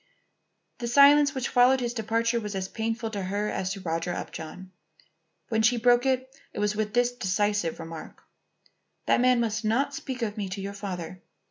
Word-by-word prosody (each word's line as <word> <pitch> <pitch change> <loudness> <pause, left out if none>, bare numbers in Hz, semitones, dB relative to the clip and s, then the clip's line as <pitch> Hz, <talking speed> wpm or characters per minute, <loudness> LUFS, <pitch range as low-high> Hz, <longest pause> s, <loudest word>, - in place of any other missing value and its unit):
The 240 - -3
silence 280 +3 +6
which 260 0 -1
followed 250 +1 +5
his 240 -1 -2
departure 230 +1 0
was 210 -2 -5
as 190 -1 -2
painful 225 +2 -3
to 205 -2 -3
her 200 +3 -2
as 185 0 -2
to 195 - -8
Roger 165 0 -2
Upjohn. 180 +3 -7 0.8
When 220 -1 +1
she 240 +3 +3
broke 245 +2 +4
it 260 0 -1 0.2
it - - -10
was 210 0 0
with 215 0 -2
this 245 0 +3
decisive 205 -5 -1
remark: 165 -1 -9 0.8
"That - - +3
man 250 -1 +4
must 225 -1 -1
not 245 +6 +1
speak 260 -3 -5
of 210 -1 -3
me 200 -2 -3
to 195 +2 -5
your 200 +1 -5
father. 185 -3 -6
220 Hz, 180 wpm, -27 LUFS, 195-245 Hz, 0.8 s, silence